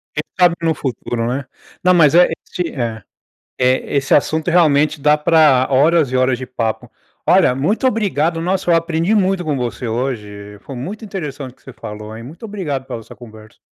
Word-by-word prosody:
Quem 150 - -1 0.2
sabe 175 -1 +5
no 165 -1 +1
futuro, 120 -4 -3
né? 130 +2 -2 0.4
Não, 180 0 +5
mas 155 -5 +5
é 175 +1 +6 0.2
esse 175 -2 -3
é. 115 -5 -4 0.6
Eh, 130 +2 +1 0.2
assunto 160 +3 +1
realmente 155 -3 +3
dá 150 +1 +3
pra 150 -5 +4
horas 145 +1 +3
e - - -1
horas 130 -1 +2
de 130 - -6
papo. 115 -3 -3 0.4
Olha, - - +5
muito 180 - 0
obrigado. 175 - 0
Nossa, 185 0 0
eu - - +5
aprendi 165 +3 0
muito 195 -3 +1
com 150 -2 0
você 120 -2 -4
hoje, 105 -4 -4
foi 135 - -9
muito 195 - -6
interessante 150 -9 -6
o - - -25
que - - -31
você 135 - -11
falou 105 +1 -8
hein, 115 - -9
muito 160 - -12
obrigado 155 -11 -4
por 115 - -6
essa 110 - -13
conversa. 110 -3 -14
145 Hz, 190 wpm, -18 LUFS, 125-170 Hz, 0.6 s, é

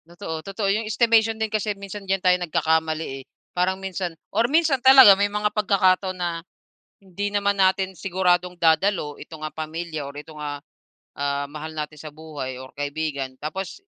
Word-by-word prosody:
Totoo, 170 -2 -6
totoo. 195 +3 -3
Yung 215 +1 -2
estimation 225 -1 +3
din 220 -1 -2
kasi 210 -1 -1
minsan 200 0 -8
diyan 195 -1 +1
tayo 180 0 +5
nagkakamali, 160 -4 0
eh. - - -15 0.3
Parang 185 +1 +1
minsan 190 -3 -4 0.2
or 235 +1 +2
minsan 305 -3 +3
talaga 265 -5 +10
may 200 +1 +1
mga 210 0 -1
pagkakataon 190 -2 +2
na, 170 -2 -2 0.6
hindi 195 +2 -4
naman 200 0 +1
natin 190 0 +2
siguradong 180 -1 0
dadalo 165 -2 +2
itong, 160 -2 -10
ah, 155 - -6
pamilya 155 -1 -5
or - - -11
itong, 150 +1 -10
ah, 145 -1 -4 0.6
ah, 140 0 -1
mahal 155 +2 -7
natin 150 0 -5
sa 155 - -8
buhay 150 -5 -7
or 130 - -10
kaibigan 145 -2 -3
tapos 190 - -5
180 Hz, 170 wpm, -23 LUFS, 155-200 Hz, 0.6 s, talaga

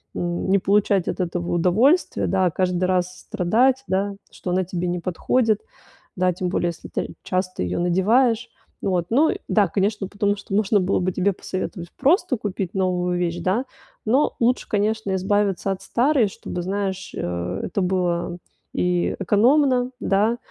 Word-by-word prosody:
м, 175 +1 -2
не 195 - +5
получать 200 -1 +2
от - - -3
этого 175 -1 -2
удовольствия, 215 - +3
да, 190 -1 +2
а - - -1
каждый 180 +1 0
раз 185 0 0
с - - -14
страдать, 250 +9 +2
да, 195 +1 0 0.2
что - - -7
она 185 +1 +2
тебе 180 0 -3
не 175 0 -1
подходит. 215 +6 +1 0.6
Да, 180 0 +2
тем 180 +1 -3
более, 175 -1 0
если 170 - -8
ты - - -4
часто 185 0 -2
ее 90 0 -2
надеваешь. 225 +7 +2 0.3
Вот, 180 -3 0
ну 290 +7 +4
и - - -1
да, 205 -3 +3
конечно, 200 +2 -1
потому 205 +1 0
что 200 0 -8
можно 210 0 +3
было 190 +1 +1
бы 185 +1 0
тебе 185 +2 +1
посоветовать 180 -1 -5
просто 290 - +2
купить 195 -4 -4
новую 180 -2 0
вещь, 170 -1 -1
да. 190 +9 0 0.4
Но 255 +7 +2
лучше, 245 +2 +1
конечно, 210 -1 0
избавиться 195 0 0
от 190 0 -4
старой, 250 +2 +2
чтобы, 180 -2 -6
знаешь, 190 0 -3
э, 90 +2 -3
это 195 - -2
было 175 -2 0 0.4
и, 180 -1 0
э, - - -2
экономно, 250 - +3
да, 215 +4 +2
190 Hz, 170 wpm, -23 LUFS, 180-215 Hz, 0.6 s, не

